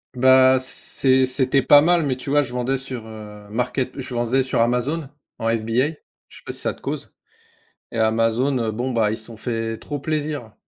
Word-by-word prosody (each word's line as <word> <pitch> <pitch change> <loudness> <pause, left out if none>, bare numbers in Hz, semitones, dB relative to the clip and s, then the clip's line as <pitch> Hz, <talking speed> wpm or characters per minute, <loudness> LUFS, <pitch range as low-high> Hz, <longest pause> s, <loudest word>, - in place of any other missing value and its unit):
ben 130 +1 +5
c'est 130 0 +2
c'était 130 +1 +1
pas 145 +1 +7
mal, 170 +1 +3
mais 130 -3 -1
tu 130 - -7
vois, 145 +1 +3
je 125 - -7
vendais 125 +2 -1
sur, 130 -4 -5
heu, 105 -2 -11
market 125 +4 -2
je 130 -1 -3
vendais 120 +2 +1
sur 130 -2 +1
Amazon 130 +6 0 0.3
en 115 - -1
FBA. 115 +4 +1 0.4
Je - - -13
sais - - -13
pas - - -5
si - - -4
ça - - -1
te - - -21
cause? - - -5 0.8
Et - - -5
Amazon, 115 +4 +1
heu, 115 -2 -1
bon 125 +4 -3
bah, 110 -3 +1
ils 110 - -3
se 110 - -5
sont 115 -1 -11
fait 115 -1 -3
trop 145 +4 -6
plaisir. 145 -6 -3
125 Hz, 210 wpm, -22 LUFS, 115-135 Hz, 0.8 s, pas